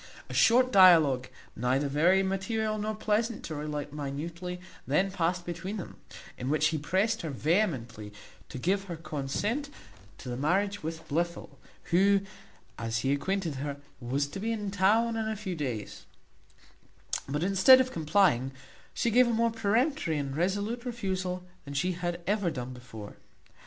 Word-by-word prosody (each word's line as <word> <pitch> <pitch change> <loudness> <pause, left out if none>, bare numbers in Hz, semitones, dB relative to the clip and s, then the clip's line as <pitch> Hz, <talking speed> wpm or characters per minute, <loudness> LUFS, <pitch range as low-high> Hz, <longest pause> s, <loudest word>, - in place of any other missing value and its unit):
A - - -6
short 255 +2 +5
dialogue, 160 - +6 0.3
neither 130 +5 +1
very 170 +7 +3
material 215 +3 -1
nor 215 +1 -2
pleasant 215 +1 -1
to 160 - -5
relate 150 -1 -4
minutely, 165 +5 -5 0.3
then 185 +8 +2
passed 175 -1 -1
between 175 +4 -4
them, 185 - -8 0.4
in 125 - -3
which 155 +1 +3
he 155 -1 -2
pressed 200 +9 0
her 160 - -4
vehemently 135 - -1 0.4
to - - -7
give 195 +9 0
her 175 -3 -5
consent 165 - -3 0.5
to - - -11
the 120 - -3
marriage 195 +9 0
with 160 +1 -6
Blifil, 165 -3 -3 0.3
who, 195 +3 +4 0.6
as 115 0 -2
he 135 - +2
acquainted 165 +1 -1
her, 140 +1 -4 0.2
was 135 +3 -1
to 195 - -6
be 225 +3 -1
in 210 -3 -3
town 215 +4 +3
in 220 -1 -1
a 220 - -2
few 195 -3 -4
days; 125 -9 -5 1.2
but, 145 +3 -1
instead 195 +7 +7
of 260 0 +1
complying, 155 -6 +2 0.4
she 235 - +1
gave 250 +2 +5
a - - +1
more 230 0 +2
peremptory 225 - +1
and 140 -2 -3
resolute 205 +8 -1
refusal 190 -7 -3 0.2
than 140 -1 -8
she 180 +6 +1
had 175 0 -3
ever 200 -1 +1
done 130 -4 -5
before. 115 -4 -10
180 Hz, 155 wpm, -29 LUFS, 145-205 Hz, 1.2 s, instead